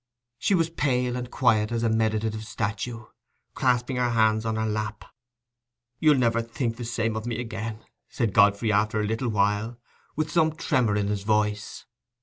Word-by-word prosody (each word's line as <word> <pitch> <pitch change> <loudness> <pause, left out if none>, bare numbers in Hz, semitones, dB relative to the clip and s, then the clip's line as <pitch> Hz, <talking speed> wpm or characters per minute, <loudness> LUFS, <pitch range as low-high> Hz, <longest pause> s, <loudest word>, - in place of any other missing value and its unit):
She 200 - +2
was 165 -2 +1
pale 125 -5 0
and 125 -1 -4
quiet 110 -4 +2
as 115 0 -1
a 115 - +2
meditative 110 -1 0
statue, 110 +1 -4 0.5
clasping 125 0 +1
her 125 -1 +1
hands 110 -1 +2
on 110 - 0
her 110 0 -1
lap. 110 0 -3 0.9
"You'll 150 -3 +5
never 115 -2 +2
think 115 0 -3
the 120 - -5
same 115 -1 -1
of 110 +1 -4
me 120 -1 -2
again," 110 -1 -5 0.2
said 115 -7 -1
Godfrey, 105 +1 +4
after 105 +1 +1
a 105 - 0
little 115 +3 -1
while, 105 +2 0 0.4
with 155 0 -2
some 160 -1 +3
tremor 130 - +1
in 105 -1 +1
his 105 -1 -1
voice. 105 0 -1
115 Hz, 170 wpm, -26 LUFS, 110-125 Hz, 0.9 s, You'll